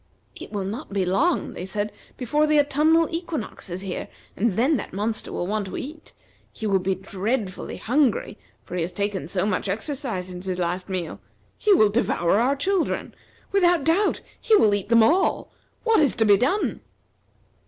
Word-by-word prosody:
"It - - -9
will 205 -2 -2
not 215 +9 -6
be 195 -2 0
long," 280 - +1
they - - -6
said, 205 +2 -2 0.3
"before 295 +5 +1
the 305 -1 +4
autumnal 305 +3 +3
equinox 330 - -5
is 180 +2 -4
here, 190 -2 -4 0.3
and 220 0 +1
then 260 - +2
that - - -7
monster 215 +3 -2
will - - -2
want 205 +1 -2
to - - -6
eat. 305 +4 -8 0.4
He 220 - -7
will 195 -2 +2
be 190 +1 0
dreadfully 195 +2 -3
hungry, 250 -4 +1 0.3
for 180 - -7
he 180 - -1
has 175 +2 -3
taken 200 -4 -2
so 180 +2 0
much 210 -1 -1
exercise 225 -2 -3
since 180 +1 -8
his 185 -1 -2
last 180 +2 -2
meal. 180 -4 -4 0.4
He 425 - +1
will 215 - +6
devour 200 -4 +1
our 260 +4 +2
children. 370 +5 -1 0.4
Without 355 -5 +3
doubt, 345 +7 +2 0.2
he 445 - +4
will 215 - +5
eat 205 0 -2
them 230 -1 +6
all. 350 +11 +2 0.3
What 450 -6 +4
is 290 - +2
to 225 - +2
be 205 -1 +7
done?" 265 - 0
215 Hz, 185 wpm, -24 LUFS, 190-300 Hz, 0.4 s, be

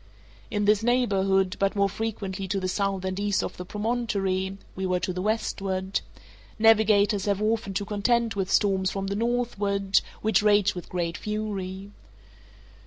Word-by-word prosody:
In 210 -2 -1
this 210 0 +4
neighborhood, 195 -6 +2
but 195 0 +1
more 200 -1 +3
frequently 195 -2 -4
to 195 +1 -1
the 185 - -2
south 195 0 -1
and 185 +1 -2
east 205 -1 +1
of - - -5
the 180 - -6
promontory 200 -4 -1 0.2
(we 190 - -4
were 180 -1 +1
to 180 +1 -2
the 180 - -3
westward), 195 -2 -1 0.6
navigators 215 -2 +4
have 200 -2 +1
often 215 -2 -1
to 200 - -1
contend 225 +3 +1
with 195 -2 -2
storms 190 -2 +2
from 195 0 -3
the 200 +1 -2
northward, 205 -4 +1 0.2
which 220 0 +3
rage 210 -1 +4
with 180 - -8
great 170 -2 -2
fury. 200 -2 -4
200 Hz, 160 wpm, -26 LUFS, 190-215 Hz, 0.6 s, this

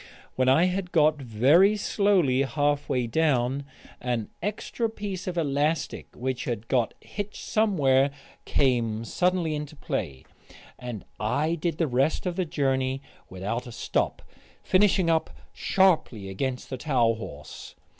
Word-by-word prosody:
When 130 0 +3
I 135 +6 +5
had 180 0 -2
got 155 -2 +3
very 140 - +4
slowly 190 -11 +2
halfway 145 -2 0
down, 135 0 +1 0.4
an 120 -3 -2
extra 215 +3 -2
piece 200 -4 -5
of 180 -1 -3
elastic 150 +1 0
which 130 0 -3
had 115 -2 -3
got 120 -3 +1
hitched 205 +1 -6
somewhere 145 -11 +3 0.3
came 115 -4 +1
suddenly 180 - +1
into 150 0 -5
play, 95 - -4 0.5
and 120 -5 -6
I 145 +9 0
did 170 -1 -2
the 165 - +2
rest 135 +5 +1
of 180 -1 -1
the 185 -1 0
journey 135 -4 0 0.3
without 105 +7 -4
a - - -8
stop, - - -1 0.4
finishing 190 -2 +3
up 165 -1 +2 0.2
sharply 160 - +2
against 125 +8 -3
the 130 - -3
towel 125 -4 +2
horse. 90 -9 -9
140 Hz, 135 wpm, -26 LUFS, 125-175 Hz, 0.5 s, I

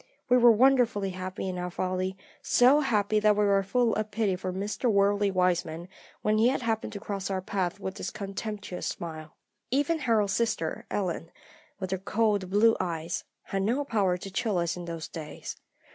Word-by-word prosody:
We 250 - +6
were 240 -1 +8
wonderfully 235 -4 +3
happy 185 +1 -5
in 180 -1 -3
our 180 0 -3
folly, 185 +1 -2 0.2
so 255 +4 +5
happy 215 -6 +2
that 210 0 +4
we 210 - +3
were 200 -1 +4
full 230 +4 +1
of 215 0 -2
pity 210 -3 0
for 185 0 -4
Mr. 205 +6 -1
Worldly 200 0 +3
Wiseman 175 -3 0 0.4
when 215 0 +2
he 225 - +5
happened 230 -4 0
to 205 - -5
cross 200 -1 -4
our 190 -1 -1
path 190 -1 -2
with 195 0 -5
his - - -3
contemptuous 200 -1 -5
smile. 160 -2 -6 0.3
Even 290 +5 +1
Harold's 220 -7 +2
sister 220 -8 -1
Ellen, 175 -4 -2 0.5
with 190 -2 -4
her 190 - -1
cold 205 -1 0
blue 220 +3 +5
eyes, 165 -1 -3 0.2
had 195 - -2
no 245 +9 0
power 195 -8 +1
to 195 +2 -8
chill 215 -1 0
us 170 -1 0
in 175 -1 -7
those 165 -2 -5
days. 155 -3 -7
200 Hz, 180 wpm, -28 LUFS, 185-220 Hz, 0.5 s, were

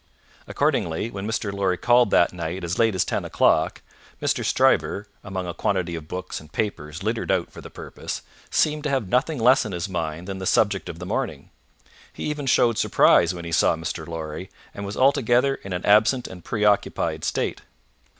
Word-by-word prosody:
Accordingly, 85 +8 0
when 100 +1 -5
Mr. 110 -2 -2
Lorry 95 -2 0
called 120 +1 +4
that 85 - +3
night 85 +1 -4
as 85 +1 -3
late 115 -3 +3
as 90 - +1
ten - - -2
o'clock, - - +2 0.4
Mr. - - 0
Stryver, 100 - +2 0.2
among 95 -2 -4
a 85 - -4
quantity 90 -1 -1
of 80 -2 -6
books 90 +2 -5
and 75 0 -16
papers 85 -5 -3
littered 110 +2 -2
out 95 -3 0
for - - -11
the - - -10
purpose, - - -7 0.3
seemed 150 -1 +1
to - - +1
have 130 -7 0
nothing 140 - +1
less 125 +3 +5
on 105 -4 -5
his 85 0 -3
mind 85 -1 -4
than 95 -1 -5
the 95 - -3
subject - - +2
of - - -7
the - - -7
morning. - - -3 0.6
He - - -8
even 150 -2 -3
showed 120 -3 +3
surprise 85 +1 +4
when 85 -1 -7
he 85 - -6
saw 80 - +3
Mr. 80 -1 -5
Lorry, 80 +2 -6 0.2
and 100 0 -6
was 100 - -6
altogether 130 0 +3
in 95 - -9
an 90 0 -3
absent 110 +5 +4
and 90 -2 -11
preoccupied 105 -2 0
state. - - -1
95 Hz, 190 wpm, -24 LUFS, 85-115 Hz, 0.6 s, less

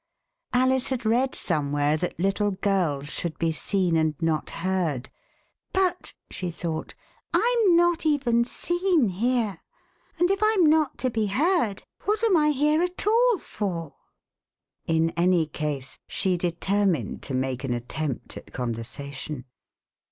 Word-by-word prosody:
Alice 260 0 +3
had 255 -4 -3
read 245 +4 +2
somewhere 145 -2 +1
that 175 +2 -3
little 195 +3 +1
girls 180 -7 0
should 170 -2 -2
be 165 -1 +1
seen 180 +1 0
and 160 -1 +2
not 160 -2 0 0.2
heard; 170 -9 -1 0.6
but," 370 -1 0 0.2
she 180 - -3
thought, 165 -1 -4 0.4
Tm 460 -7 +4
not 345 0 +3
even 265 -7 +2
seen 345 - +1
here, 220 -1 0 0.6
and 355 +2 +3
if 390 - +1
Tm 430 -3 +3
not 310 -2 +3
to 255 - -1
be 220 -2 0
heard, 250 - +1 0.2
what 425 +2 0
am 435 -5 +4
I 300 -2 +4
here 300 +2 +2
at 360 +1 -2
all 465 +1 +4
for.'^" 175 - -4 0.9
In 165 0 +2
any 175 -1 +2
case 145 -4 -4
she 190 -2 0
determined 175 - 0
to 135 - -3
make 130 0 -2
an 135 - -2
attempt 125 +3 -3
at - - -12
con 125 -2 -2
versation. 130 +4 -6
195 Hz, 140 wpm, -25 LUFS, -, 0.9 s, Tm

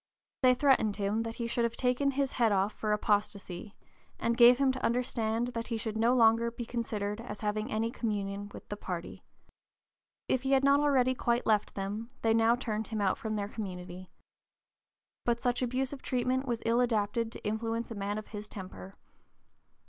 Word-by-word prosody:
They 255 -1 +6
threatened 250 -6 +3
him 205 +2 0
that 225 0 -4
he 235 - -3
should 235 0 0
"have 235 0 0
his - - -9
head 260 -1 +2
taken 215 - +2
off 195 +2 +1
for 215 - -2
apostasy," 205 -2 -1 0.4
and 235 - +1
gave 240 0 +8
him 275 -1 +3
to 260 - -6
understand 235 -1 0
that 230 -2 -4
he 230 - -2
"should 220 0 -4
no 230 +3 +3
longer 230 -1 +5
be 235 0 -6
considered 220 -3 -3
as 210 -4 -7
having 215 0 -2
any 225 +2 0
communion 205 -3 -3
with - - -11
the 205 - -3
party." 180 -4 -6 1.0
If 260 - +1
he 270 +1 +1
had 270 0 +4
not 280 +1 +5
already 265 -3 +3
quite 240 -1 0
left 215 -2 +1
them, 205 +4 -4
they 225 -1 +4
now 225 +1 +4
turned 220 -3 -3
him 220 -1 -3
out 195 -2 +1
from 220 -1 -3
their 200 -1 -2
community. 185 -3 -7 1.1
But 235 -1 +1
such 245 0 0
abusive 260 +2 -2
treatment 255 +1 0
was 235 -2 -2
ill 230 +2 +3
adapted 230 -1 0
to - - -10
influence 225 +2 -2
a - - -2
man 205 0 -3
of 215 - -7
his 210 -1 -7
temper. 190 -1 -9
225 Hz, 185 wpm, -31 LUFS, 210-245 Hz, 1.1 s, gave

